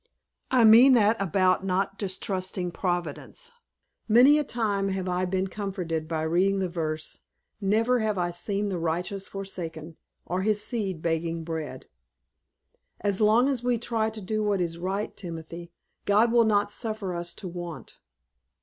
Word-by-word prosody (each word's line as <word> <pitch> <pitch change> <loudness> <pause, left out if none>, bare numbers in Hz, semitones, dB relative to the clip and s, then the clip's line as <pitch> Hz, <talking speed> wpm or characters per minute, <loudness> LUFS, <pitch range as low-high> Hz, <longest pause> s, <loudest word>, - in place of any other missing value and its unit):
"I 255 -2 +4
mean 235 +5 +8
that 220 -2 +4
about 185 0 +2
not 195 +1 -1
distrusting 185 -2 -2
Providence. 175 - -4 0.6
Many 255 +7 +6
a - - +1
time 205 -6 -1
have 190 -1 -2
I 180 0 0
been 185 +1 0
comforted 185 -5 -4
by 160 -1 -2
reading 180 +5 +2
the 190 -2 -1
verse, 155 -2 -3 0.4
'Never 225 +5 +2
have 215 -2 0
I 175 -1 0
seen 200 +4 -2
the 185 -3 -2
righteous 175 +4 -2
forsaken, 165 -5 -6 0.3
or 180 +2 -2
his 210 +1 +1
seed 195 -9 -3
begging 165 0 -1
bread.' 160 -5 -5 1.2
As 200 0 0
long 220 +5 +5
as 265 -4 -1
we 245 -1 +2
try 225 -1 -1
to 220 -1 -8
do 215 +3 -2
what 205 -2 +1
is 170 -1 -2
right, 195 +4 -3
Timothy, 170 -1 -8 0.3
God 215 +3 +4
will 235 -1 +5
not 205 -1 +2
suffer 215 -5 -3
us 170 0 -4
to 190 - -7
want." 170 -7 -8
190 Hz, 155 wpm, -27 LUFS, 170-215 Hz, 1.2 s, mean